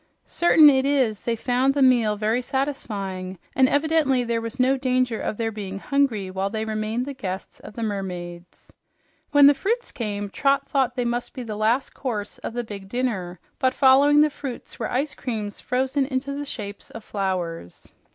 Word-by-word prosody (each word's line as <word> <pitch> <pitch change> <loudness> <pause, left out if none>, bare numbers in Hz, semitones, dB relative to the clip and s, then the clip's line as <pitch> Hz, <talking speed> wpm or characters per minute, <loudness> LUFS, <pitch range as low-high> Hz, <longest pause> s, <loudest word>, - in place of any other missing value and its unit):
Certain 325 -3 +6
it 265 -2 +5
is 260 -8 +1
they 235 - +1
found 255 +4 +1
the 285 - +1
meal 235 -5 +4
very 220 +4 0
satisfying, 205 -9 -3 0.2
and 260 -1 +5
evidently 290 -4 +2
there 230 -1 -1
was 230 +3 -6
no 260 +2 +4
danger 255 -3 0
of 210 - -3
their 225 -1 -1
being 200 -3 -6
hungry 225 -6 0
while 190 +1 -1
they 220 +1 -3
remained 220 +3 -2
the 280 - -5
guests 190 -7 -6
of - - -12
the 230 - -4
mermaids. 180 -4 -6 0.6
When 290 -1 +6
the 285 - +8
fruits 460 - -2
came, 205 -4 -4
Trot 275 +3 +1
thought 260 -3 +1
that 245 - -1
must 240 0 -2
be 255 - -5
the 220 -3 -5
last 225 +5 +1
course 215 -6 -4
of - - -6
the 240 0 -2
big 200 -3 -9
dinner, 195 -8 -2 0.2
but 260 -1 +1
following 280 +2 +6
the 305 0 +3
fruits 270 -4 -7
were 225 - -2
ice 275 +4 -1
creams 215 -5 -5
frozen 265 +2 0
into 270 +1 -2
the 290 +1 -4
shape 205 -7 -6
of 225 - -7
flowers. 180 - -4
240 Hz, 185 wpm, -24 LUFS, 205-270 Hz, 0.6 s, the